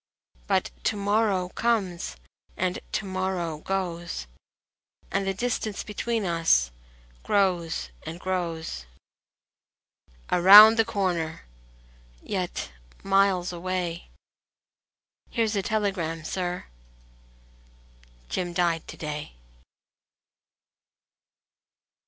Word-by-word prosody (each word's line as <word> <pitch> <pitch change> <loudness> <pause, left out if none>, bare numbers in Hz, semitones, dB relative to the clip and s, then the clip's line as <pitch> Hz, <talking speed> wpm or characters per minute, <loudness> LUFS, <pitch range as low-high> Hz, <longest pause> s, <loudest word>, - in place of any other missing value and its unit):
But - - +1
to - - +2
morrow 200 -2 +1
comes 190 - -1 0.4
and 185 0 -1
to 215 - -1
morrow 185 -4 -2
goes, 175 - -3 0.9
And 195 0 0
the 195 - +1
distance 220 -1 -2
between 220 +1 -2
us 165 - +3 0.5
grows 175 - 0
and 165 +2 -7
grows. 165 - -3 1.4
Around 210 +5 +10
the 225 - +5
corner! 180 -7 -2 0.8
yet 185 -3 -3 0.3
miles 195 -2 +2
away.... 175 -1 -3 1.2
"Here 230 -2 +1
s 215 0 -2
a 200 - +1
telegram, 190 -6 -1
sir... 180 +1 -3 0.9
." - - -29
"Jim 175 - -3
died 170 -2 0
to - - -9
day." 150 - -5
180 Hz, 85 wpm, -26 LUFS, 165-195 Hz, 1.4 s, Around